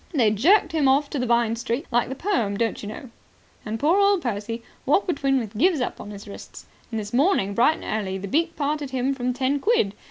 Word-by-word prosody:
They 235 -8 +3
jerked 325 - +4
him 310 -4 +2
off 280 +2 +2
to 270 -4 -1
Vine 235 -2 +2
Street. 235 +5 -3
Like 240 0 +1
the 265 - -4
poem, 260 - -1
don't 230 0 -1
you 205 - -6
know. 235 +3 -9 0.5
'And 220 +1 -4
poor 325 +7 +3
old 400 -3 +3
Percy 230 0 -3 0.2
walked 295 +9 +2
between 275 -6 +1
with 225 -4 -4
gyves 330 - +3
upon 230 -4 -4
his 205 0 -10
wrists.' 200 - -10 0.2
And 225 - -3
this 210 +1 -7
morning, 260 - +2
bright 245 +9 +3
and 215 -2 -2
early, 190 0 -3
the 195 +1 -6
beak 330 - 0
parted 295 -1 -2
him 260 +1 0
from 250 -2 -2
ten 265 +3 0
quid. 330 - +2
255 Hz, 220 wpm, -24 LUFS, 220-295 Hz, 0.5 s, jerked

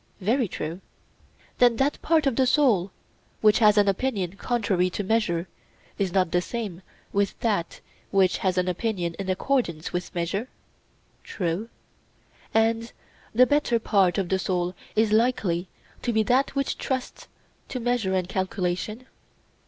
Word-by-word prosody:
Very 230 +5 +1
true. 170 +1 -5 0.8
Then 245 -1 +5
that 270 +5 0
part 320 -2 +2
of 270 -4 +2
the 260 0 +3
soul 240 - +3 0.5
which 215 -1 +5
has 210 -2 +5
an 205 -1 +5
opinion 195 -3 -1
contrary 200 -5 0
to 205 - -3
measure 190 -5 0 0.5
is 195 -3 0
not 185 -2 +1
the 175 - +2
same 200 -4 -5 0.3
with 200 0 0
that 205 -7 -1 0.3
which 190 -2 +3
has 185 -1 0
an 180 0 +1
opinion 180 -2 -1
in 195 -1 -4
accordance 185 - -1
with 180 0 -4
measure? 185 +8 -2 0.7
True. 185 +4 -3 0.8
And 225 +1 +1 0.4
the 250 +2 +7
better 290 -4 +2
part 200 -5 +2
of 190 -3 -1
the 190 - +1
soul 180 -1 -1 0.2
is 215 0 +3
likely 215 -6 +1 0.3
to 240 - -1
be 220 -1 +2
that 255 +6 +1
which 275 0 -1
trusts 260 -1 -4 0.4
to 255 - -3
measure 235 -5 0
and 185 -1 0
calculation? 190 +4 -2
205 Hz, 145 wpm, -25 LUFS, 180-235 Hz, 0.8 s, the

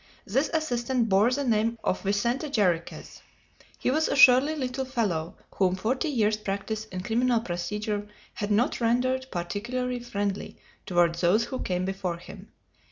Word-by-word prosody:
This 270 +9 +1
assistant 250 -6 0
bore 200 +4 +4
the 280 +3 -1
name 230 -1 +1
of - - 0
Vicente 235 +9 0
Jarriquez. 180 - -1 0.6
He - - 0
was 315 +3 +2
a - - 0
surly 275 +3 +7
little 265 -2 -2
fellow, 205 -11 -2 0.2
whom 185 -2 +2
forty 255 - -1
years' 215 -6 +1
practice 210 +1 -4
in 185 -4 -6
criminal 240 +2 +2
procedure 210 +3 -3 0.3
had 205 - -4
not 220 +4 +1
rendered 255 +3 +1
particularly 240 +8 -3
friendly 205 -4 -3 0.3
toward 175 -2 +3
those 185 +6 +3
who 255 +2 -5
came 180 0 -1
before 190 -2 -3
him. 195 +3 -12
220 Hz, 150 wpm, -27 LUFS, 195-250 Hz, 0.6 s, surly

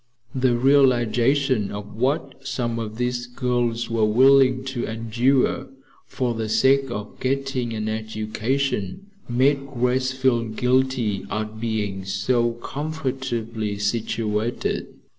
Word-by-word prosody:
The 130 -2 +2
realization 130 -2 +3
of 105 0 -7
what 135 +3 -1
some 120 -3 -2
of 110 -1 -5
these 125 0 -1
girls 120 -2 -1
were 115 -1 0
willing 130 +3 +5
to 135 -3 -3
endure 115 +4 +1 0.4
for 125 -2 -1
the 110 -1 -3
sake 135 +5 +3
of 105 -3 -6
getting 135 -2 -1
an 110 -1 -3
education 110 - -2 0.2
made 135 +4 +3 0.2
Grace 125 +2 +1
feel 130 -3 +1
guilty 125 -2 0
at 110 0 -4
being 105 -4 -2
so 120 +4 +1
comfortably 130 -8 -3
situated. 110 +1 -1
120 Hz, 110 wpm, -23 LUFS, 110-130 Hz, 0.4 s, willing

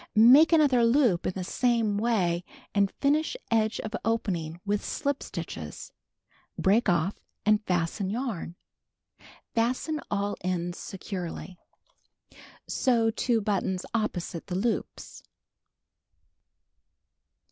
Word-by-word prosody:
Mak(> 260 +9 +8
another 285 -7 +5
loop 230 -7 +3
in - - -1
the 185 - -4
same 230 +1 +1
way 185 -7 +1 0.3
and 200 -1 +3
finish 300 - 0
edge 220 0 +2
of 215 - -6
oju 225 -1 0
ning 165 -2 -3
with 205 0 0
slip 285 -1 -2
stitches, 80 - -7 0.7
lireak 205 +3 +3
off 175 +2 +1 0.3
and 210 0 +3
fasten 180 +2 0
yarn. 215 -7 -3 1.0
I'asten 255 +7 0
all 205 0 -1
ends 175 -1 -2
securely. 185 -2 -6 1.1
Sew 230 -4 +2
two 230 0 +1
buttons 195 -3 -1
opposite 180 -7 -2
the 180 - -3
Ioojjs. 220 +4 -3
210 Hz, 105 wpm, -28 LUFS, 180-235 Hz, 1.1 s, Mak(>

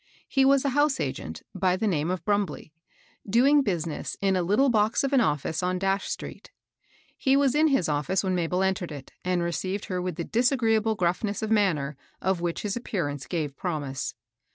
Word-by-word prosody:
He 270 -1 +3
was 275 0 +4
a - - +3
house 290 +1 +2
agent, 80 - -4
by 185 -1 +1
the 220 - -1
name 165 -5 0
of 180 -3 -3
Brumblej, 200 -7 -1 0.6
doing 270 +7 +5
business 170 - -3
in 195 -1 +2
a 185 - +2
little 210 +11 +3
box 215 0 +2
of 275 0 -1
an 265 - +5
office 155 - 0
on 180 0 0 0.2
street. - - -7 0.7
He 270 0 +2
was 275 -2 +3
in 310 +2 +4
his 270 - +2
office 150 +6 0
when 190 -1 0
Mabel 180 +1 0
entered 190 -3 -1
it, 140 -3 -9
and 180 -1 0
received 185 +4 -2
her 180 -1 -2
with 180 -2 -3
the 170 - -3
disagreeable 225 - +2
gruffiiess 185 +4 -1
of 220 - -2
manner, 155 -10 +1 0.2
of 190 -2 0
which 170 -1 -2
his 205 -2 -2
ap 240 - -6
pearance 145 -8 -3
gave 155 -6 -2
promise. 145 -7 -3
190 Hz, 190 wpm, -26 LUFS, 170-225 Hz, 0.7 s, doing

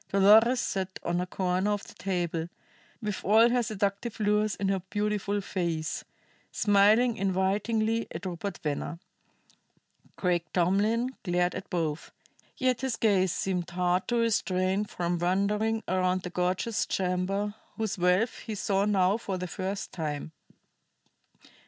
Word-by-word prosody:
Dolores 220 +6 +6
sat 190 -4 -2
on 175 +1 0
a 180 - -3
corner 185 +2 0
of 205 -1 -1
the - - -12
table, 175 -3 -2 0.5
with 210 -2 -3
all 220 +4 +6
her 245 0 +3
seductive 210 0 -2
lures 210 0 +2
in 195 - -2
her 195 -1 0
beautiful 205 -1 -1
face, 170 -5 -2 0.5
smiling 215 +3 +4
invitingly 205 +4 0
at 170 +4 -7
Rupert 180 +1 -4
Venner. 150 +2 -2 1.2
Craik 175 -2 -1
Tomlin 210 +8 +1
glared 175 -2 +1
at - - -7
both, 165 -2 -2 0.5
yet 255 -1 +1
his 265 -3 -1
gaze 195 -6 +2
seemed 180 -2 -2
hard 180 +1 0
to 240 - 0
restrain 195 -4 +1
from 175 -3 -2
wandering 210 +5 +1
around 185 0 +1
the 180 - -5
gorgeous 180 +5 0
chamber, 190 +2 -1 0.2
whose 220 -4 -2
wealth 180 +6 +2
he 220 - -5
saw 195 0 +1
now 195 -1 +3
for 195 -5 -4
the 180 - -4
first 190 +2 -4
time. 155 -2 -4
195 Hz, 135 wpm, -28 LUFS, 180-210 Hz, 1.2 s, Dolores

